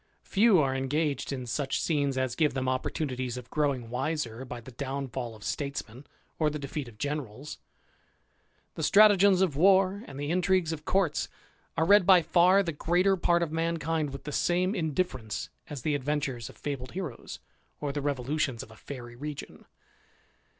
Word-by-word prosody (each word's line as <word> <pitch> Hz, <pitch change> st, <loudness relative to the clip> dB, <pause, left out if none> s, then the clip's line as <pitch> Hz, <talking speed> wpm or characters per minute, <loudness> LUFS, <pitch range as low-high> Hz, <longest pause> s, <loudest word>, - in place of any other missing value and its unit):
Few 210 Hz, 0 st, +4 dB
are 135 Hz, -3 st, +1 dB
engaged 140 Hz, +1 st, -1 dB
in 130 Hz, -2 st, -4 dB
such 135 Hz, +3 st, -1 dB
scenes 140 Hz, -4 st, 0 dB
as 130 Hz, -2 st, 0 dB
give 150 Hz, -1 st, +2 dB
them 130 Hz, -1 st, -1 dB
opportunities 130 Hz, -1 st, -2 dB
of 125 Hz, -1 st, -9 dB
growing 135 Hz, -6 st, 0 dB
wiser 130 Hz, -2 st, -2 dB
by 125 Hz, -2 st, -7 dB
the 120 Hz, +3 st, -12 dB
downfall 130 Hz, -2 st, -4 dB
of 105 Hz, -, -14 dB
statesmen 140 Hz, 0 st, -4 dB, 0.3 s
or 155 Hz, -2 st, +3 dB
the 150 Hz, -, -4 dB
defeat 140 Hz, -1 st, -5 dB
of 115 Hz, -3 st, -13 dB
generals. 145 Hz, 0 st, -5 dB, 1.1 s
The -, -, -6 dB
stratagems 200 Hz, -2 st, +6 dB
of 170 Hz, -7 st, 0 dB
war, 190 Hz, +4 st, +4 dB
and 135 Hz, -, -9 dB
the 145 Hz, +2 st, -2 dB
intrigues 180 Hz, -1 st, +2 dB
of 150 Hz, -1 st, -8 dB
courts, 185 Hz, -6 st, +1 dB, 0.5 s
are 160 Hz, -, +3 dB
read 200 Hz, 0 st, +6 dB
by 185 Hz, -3 st, +7 dB
far 180 Hz, +4 st, +5 dB
the 170 Hz, -, -2 dB
greater 175 Hz, +5 st, +2 dB
part 175 Hz, -1 st, +2 dB
of 160 Hz, -, -3 dB
ttiankind 165 Hz, -1 st, -1 dB
with 135 Hz, 0 st, -8 dB
the 150 Hz, -, -5 dB
same 180 Hz, +5 st, +1 dB
indifference 155 Hz, -, -2 dB, 0.2 s
as 145 Hz, -4 st, -6 dB
the 155 Hz, -, +1 dB
adventures 140 Hz, -4 st, -2 dB
of -, -, -14 dB
fe.bled 135 Hz, -3 st, -5 dB
heroes, 175 Hz, -9 st, -6 dB, 0.4 s
or 145 Hz, -1 st, -2 dB
the 145 Hz, +1 st, -3 dB
revolutions 140 Hz, -2 st, -1 dB
of -, -, -14 dB
a -, -, -13 dB
fairy 120 Hz, -1 st, -9 dB
region. 145 Hz, +3 st, -7 dB
145 Hz, 170 wpm, -29 LUFS, 130-170 Hz, 1.1 s, by